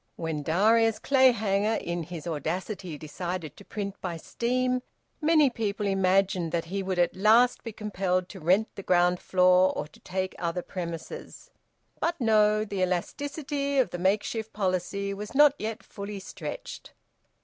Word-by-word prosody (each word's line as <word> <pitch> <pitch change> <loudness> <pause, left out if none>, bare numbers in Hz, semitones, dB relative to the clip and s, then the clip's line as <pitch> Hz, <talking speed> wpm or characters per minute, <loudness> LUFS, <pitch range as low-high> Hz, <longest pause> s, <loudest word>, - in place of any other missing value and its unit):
When 160 -2 -3
Darius 215 +8 +3
Clayhanger, 220 -6 +3
in 170 0 -3
his 165 -1 -7
audacity, 170 +2 -3
decided 160 0 -5
to - - -13
print 200 -1 -6
by 175 -3 -3
steam, 250 +7 -1 0.4
many 305 -1 +5
people 210 -3 -2
imagined 190 -3 +2
that 165 -1 0
he 200 - 0
would 190 -1 -2
at 175 0 +2
last 225 +5 +4
be 230 - -5
compelled 190 -4 -1
to 195 - -9
rent 185 +7 +3
the - - -7
ground 180 -1 +3
floor 185 0 +4
or - - -2
to 150 - -18
take 185 0 -3
other 175 0 -2
premises. 170 -3 -7 0.5
But 335 -1 -1
no! 215 -2 +3
The 200 -2 -3
elasticity 280 - -2
of 250 -9 +3
the 175 - -4
makeshift 215 +4 0
policy 200 0 -1
was 210 +5 -7
not 295 0 +7
yet 220 0 -4
fully 200 0 -7
stretched. - - -8
195 Hz, 150 wpm, -27 LUFS, 180-225 Hz, 0.5 s, not